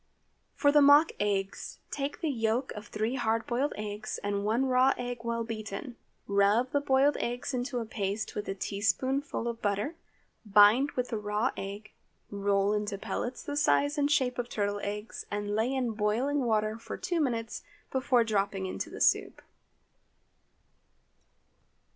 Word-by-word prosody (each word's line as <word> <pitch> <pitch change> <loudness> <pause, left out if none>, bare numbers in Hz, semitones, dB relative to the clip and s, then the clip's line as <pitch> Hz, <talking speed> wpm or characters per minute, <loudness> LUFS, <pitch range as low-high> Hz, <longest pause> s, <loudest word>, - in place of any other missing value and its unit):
For 285 - +4
the 295 0 +6
mock 290 +3 +7
eggs, 195 -1 -2
take 280 0 -3
the 325 - 0
yolks 230 +1 0
of 210 0 -9
three 215 +3 -2
hard 225 -1 0
boiled 260 +5 0
eggs, 210 0 -4
and 200 0 -1
one 225 +5 +1
raw 255 +1 +4
egg 245 0 -4
well 235 0 -1
beaten. 225 +1 -6 0.3
Rub 200 +5 +3
the 285 - +1
boiled 275 +1 +3
eggs 245 +3 -3
into 250 +1 -2
a 235 - -2
paste 210 0 -3
with 210 - -4
a 195 - -2
teaspoonful 235 +7 -1
of 235 -1 -4
butter, 205 +8 -1 0.5
bind 210 +6 +6
with 250 -1 -2
the 225 - -2
raw 210 +4 0
egg, 200 +2 -7 0.4
roll 200 0 +1
into 210 -1 -2
pellets 245 +5 -4
the 290 - -4
size 290 0 +3
and 290 -1 +1
shape 250 -4 +1
of 245 0 -3
turtle 205 -2 -1
eggs, 210 +2 -5
and 205 0 -3
lay 225 +4 +1
in 260 -3 0
boiling 235 +6 0
water 215 -1 0
for - - -7
two 345 -2 -1
minutes 230 -5 -2 0.3
before 260 -2 +3
dropping 200 -3 -1
into 185 - -4
the - - -9
soup. - - +2
225 Hz, 160 wpm, -29 LUFS, 205-260 Hz, 0.5 s, mock